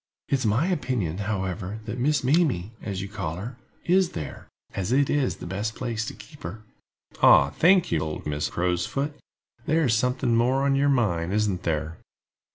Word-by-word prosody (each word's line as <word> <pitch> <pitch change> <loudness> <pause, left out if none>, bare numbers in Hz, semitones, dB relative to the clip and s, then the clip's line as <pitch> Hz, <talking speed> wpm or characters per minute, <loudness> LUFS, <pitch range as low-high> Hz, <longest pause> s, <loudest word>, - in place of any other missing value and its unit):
It - - -1
is 130 -4 +2
my 115 +10 +2
opinion, 130 - -1
however, 95 0 -3
that 115 +2 -5
Miss 150 +3 +2
Mamie, 130 - +2
as 95 -2 -4
you - - -5
call 95 -6 -4
her, 115 +8 -7 0.3
is 185 0 +3
there, 75 -5 -6 0.3
as 95 +2 -2
it 140 +2 +3
is 145 -3 +1
the - - -9
best 100 +5 -3
place 115 -3 -3
to - - -6
keep - - -14
her." 100 +7 -7 0.6
"Ah, 70 - +7
thank 180 - +4
you, 80 - +2
old 75 0 -4
Mrs. 75 0 -2
Crow's 90 0 0
foot. 145 +2 -2 0.5
There 160 +2 +3
is 125 -6 +2
something 125 +1 +1
more 125 +4 +2
on 140 0 +3
your 140 +1 +3
mind, 95 -9 +1
isn't 105 -3 0
there?" 80 -2 -2
110 Hz, 185 wpm, -25 LUFS, 90-135 Hz, 0.6 s, Ah